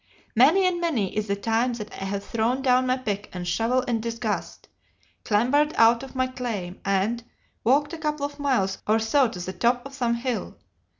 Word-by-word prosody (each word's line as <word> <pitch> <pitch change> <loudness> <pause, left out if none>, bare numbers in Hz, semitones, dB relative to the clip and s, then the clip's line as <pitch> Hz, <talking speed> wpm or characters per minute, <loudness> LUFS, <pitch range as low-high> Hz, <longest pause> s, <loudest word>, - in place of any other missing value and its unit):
Many 310 - +5
and 355 -1 +1
many 260 - -1
is 215 0 -1
the 200 - 0
time 225 +4 0
that 215 -3 -7
I 195 - -6
have 200 +1 -3
thrown 235 +3 0
down 255 -1 +3
my 255 +1 +2
pick 205 -5 -4
and 180 -1 -5
shovel 230 +8 +1
in 235 -3 -1
disgust, 230 -1 -4 0.6
clambered 270 +8 +2
out 230 +1 +5
of 270 0 -10
my 255 0 +2
claim, 225 -8 -5
and 200 +4 0 0.4
walked 290 +6 +2
a 330 - -6
couple 300 -2 -1
of 290 +1 -7
miles 240 -10 0
or 215 +1 +4
so 245 +5 +3
to 205 -5 -7
the 185 +1 -5
top 240 +6 +1
of 275 - -9
some 240 -3 0
hill. 240 0 -3
235 Hz, 195 wpm, -25 LUFS, 210-265 Hz, 0.6 s, Many